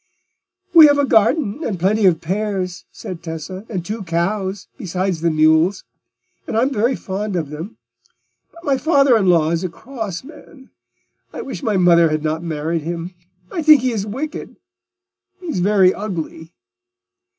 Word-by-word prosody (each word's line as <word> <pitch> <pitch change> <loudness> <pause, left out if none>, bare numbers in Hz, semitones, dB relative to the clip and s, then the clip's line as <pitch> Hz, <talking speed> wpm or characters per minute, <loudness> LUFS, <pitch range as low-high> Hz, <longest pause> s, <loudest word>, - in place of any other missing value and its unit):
"We 320 -3 +10
have 285 0 +3
a 285 - +2
garden 230 +3 +2
and 195 - -3
plenty 200 +3 +3
of 165 -4 +2
pears," 190 0 -3
said 175 -3 -8
Tessa, 170 +5 -7
"and 185 -5 -4
two 215 +3 -4
cows, 190 +3 -2
besides 185 - -3
the 170 - +2
mules; 160 +4 +3 0.6
and 220 - -2
I'm 255 +5 +2
very 235 +4 +1
fond 200 0 -4
of 155 -5 -3
them. 160 +8 -8 0.7
But 335 - -16
my 275 -4 +1
father 275 -3 +4
in 205 -4 +2
law 165 -3 +3
is 170 +2 -1
a 185 - -2
cross 220 0 -7
man: 290 -2 -15 0.6
I - - -6
wish 260 -10 -7
my 210 -3 0
mother 170 -2 +5
had 155 0 -2
not 160 +1 -1
married 165 0 -2
him. 170 +3 -5 0.4
I 335 - -2
think 305 -3 +6
he 255 - +1
is 210 -3 -3
wicked; 275 +9 -6 0.8
he 360 - -13
is 315 - -2
very 190 -1 +4
ugly." 165 -5 -6
190 Hz, 165 wpm, -19 LUFS, 170-230 Hz, 0.8 s, We